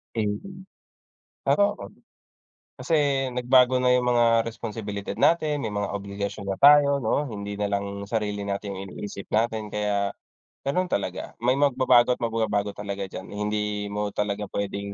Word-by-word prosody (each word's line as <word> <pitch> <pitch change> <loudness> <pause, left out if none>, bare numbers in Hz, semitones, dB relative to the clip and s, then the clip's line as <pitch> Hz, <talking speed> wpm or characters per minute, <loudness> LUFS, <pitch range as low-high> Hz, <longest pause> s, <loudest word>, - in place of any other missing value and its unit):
Eh, 110 -2 +1
yun, 185 - -6 0.8
parang 205 0 +3
ako. - - -11 1.0
Kasi 165 - -2 0.4
nagbago 125 +1 +4
na 125 0 +3
yung 125 0 +2
mga 115 -1 +4
resposibilidad 105 -3 -5
natin, 155 -3 +3
may 110 - -2
mga 105 0 -2
obligasyon 100 0 -5
na 95 - -2
tayo, 140 0 +7
'no, 145 +6 +1
hindi 100 -2 -5
nalang 100 -1 -2
sarili 105 -2 -1
natin 100 0 -3
yung 95 0 -6
iniisip 100 0 -7
natin, 110 -1 0
kaya 105 -1 0 0.5
ganun 180 +7 0
talaga. 100 - -3
May 125 +2 +3
magbabago 130 -3 +4
at - - -9
mababago 105 -3 -1
talaga 100 -1 -4
dyan, 95 - -7
hindi 105 0 -2
mo 105 0 -2
talaga 105 0 -2
pwedeng 100 0 -3
105 Hz, 150 wpm, -25 LUFS, 100-125 Hz, 1.0 s, tayo